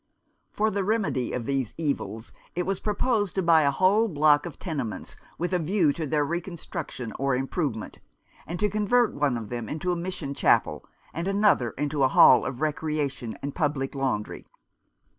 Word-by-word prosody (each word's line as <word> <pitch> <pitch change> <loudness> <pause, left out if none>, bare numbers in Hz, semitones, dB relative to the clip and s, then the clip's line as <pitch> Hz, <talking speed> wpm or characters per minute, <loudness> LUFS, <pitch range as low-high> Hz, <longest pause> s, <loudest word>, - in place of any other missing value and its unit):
For 215 +1 +1
the 200 0 -1
remedy 195 - 0
of 120 -2 -3
these 135 -4 -2
evils 140 -7 -3 0.2
it 180 - 0
was 195 -1 -1
proposed 210 -1 0
to 190 - 0
buy 165 -3 +5
the - - +4
whole 190 +10 +3
block 150 -4 +3
of - - -10
tenements, 140 - -5 0.2
with 175 +2 -2
a 180 - +2
view 165 -2 +2
to 160 0 -4
their 150 +1 +1
reconstruction 170 - -5
or 135 -1 +1
improvement, 135 -3 -3 0.5
and 175 - -5
to 210 - +3
convert 215 +4 +2
one 140 -4 0
of 110 -2 -7
them 120 -3 -5
into 160 +4 -2
a - - 0
mission 170 -5 -4
chapel, - - +2 0.3
and 170 +3 -3
another 195 - +3
into 145 0 -1
a 135 - +6
hall - - +6
of 130 0 -6
recreation 150 -5 -2
and 140 0 -3
public 145 -5 -1
laundry. 135 -6 -3
155 Hz, 175 wpm, -26 LUFS, 135-185 Hz, 0.5 s, a